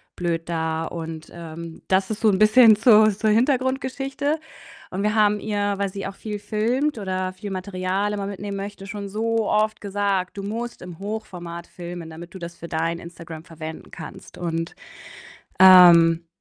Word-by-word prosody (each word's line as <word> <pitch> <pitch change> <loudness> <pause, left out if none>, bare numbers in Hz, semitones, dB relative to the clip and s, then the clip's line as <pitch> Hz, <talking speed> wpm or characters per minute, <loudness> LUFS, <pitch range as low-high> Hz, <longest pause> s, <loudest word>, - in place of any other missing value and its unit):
blöd 170 -1 -2
da 160 -1 -1
und, 160 -1 -7
ähm 165 -1 -9
das 190 +1 +2
ist 220 - -3
so 220 - +5
'n 190 - +1
bisschen 220 +1 +7
zur 215 -1 +6
zur 215 +2 0
Hintergrundgeschichte. 265 +4 0 0.5
Und 195 +2 -2
wir 210 +1 +1
haben 210 -1 +3
ihr, 205 -1 -1
weil 200 0 0
sie 195 0 -5
auch 195 - -8
viel 210 -1 -6
filmt 230 +8 0
oder 185 -2 -2
viel 200 +2 -7
Material 185 +1 -2
immer 200 -1 -3
mitnehmen 200 0 -5
möchte, 195 0 -7
schon 205 -2 -6
so 225 +1 0
oft 215 0 +1
gesagt: 200 -2 -1
„Du 195 - -4
musst 230 +4 -5
im 180 -2 -9
Hochformat 180 -5 -6
filmen, 175 -2 -8
damit 170 +2 -10
du 190 - -8
das 170 0 -7
für 170 - -8
dein 165 +1 -1
Instagram 165 -2 -10
verwenden 160 -1 -9
kannst.“ - - -10
Und, 165 -1 -3 0.8
ähm, 170 -3 +8
195 Hz, 170 wpm, -23 LUFS, 170-215 Hz, 0.8 s, ähm